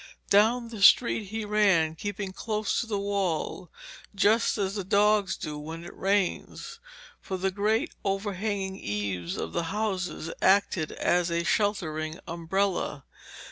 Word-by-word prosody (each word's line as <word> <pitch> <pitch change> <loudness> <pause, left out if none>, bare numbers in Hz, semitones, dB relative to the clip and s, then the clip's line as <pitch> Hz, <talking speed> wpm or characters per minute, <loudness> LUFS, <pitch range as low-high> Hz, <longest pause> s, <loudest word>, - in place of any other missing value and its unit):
Down 230 +4 +4
the 220 -3 -8
street 225 +1 +6
he 220 +2 -4
ran, 195 -7 +3
keeping 200 +2 -5
close 215 0 -1
to 235 - -6
the 210 -2 -1
wall, 195 -4 -2 0.5
just 215 +4 +3
as 195 -2 -1
the 200 -2 -3
dogs 205 0 +3
do 150 -1 -5
when 160 +3 -7
it - - -10
rains. 195 -1 -1 0.4
For 190 - -4
the 190 +1 0
great 210 +3 0
overhanging 195 0 -2
eaves 100 -4 -3
of - - -4
the 170 -1 -1
houses 185 -6 -2
act 200 +2 +4
as 175 +1 0
a 170 0 0
sheltering 160 -6 -1
umbrella. 170 -3 -1
195 Hz, 140 wpm, -27 LUFS, 170-210 Hz, 0.5 s, street